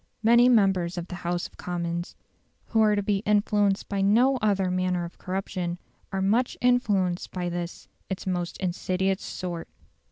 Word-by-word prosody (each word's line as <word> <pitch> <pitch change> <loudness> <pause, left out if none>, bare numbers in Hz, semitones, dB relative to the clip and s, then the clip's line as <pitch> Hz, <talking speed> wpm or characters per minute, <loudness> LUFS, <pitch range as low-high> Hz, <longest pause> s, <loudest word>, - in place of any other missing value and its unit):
Many 235 +2 +6
members 190 -6 +3
of 175 - -3
the 180 - -5
House 175 0 -1
of - - -11
Commons, 170 -1 -3 0.5
who 225 - +1
are 210 -1 +4
to 205 - 0
be 200 0 +1
influenced 205 -1 +1
by 200 -1 -1
no 240 +7 +4
other 195 -5 +1
manner 180 -1 0
of 170 - -11
corruption, 185 -2 -3 0.3
are 190 -1 -1
much 230 +6 +1
influenced 205 -8 +1
by 180 -1 -3
this 175 0 -5 0.2
its 190 -1 -4
most 180 -2 -2
insidious 185 +1 -1
sort. 175 -2 -5
190 Hz, 160 wpm, -26 LUFS, 175-210 Hz, 0.5 s, Many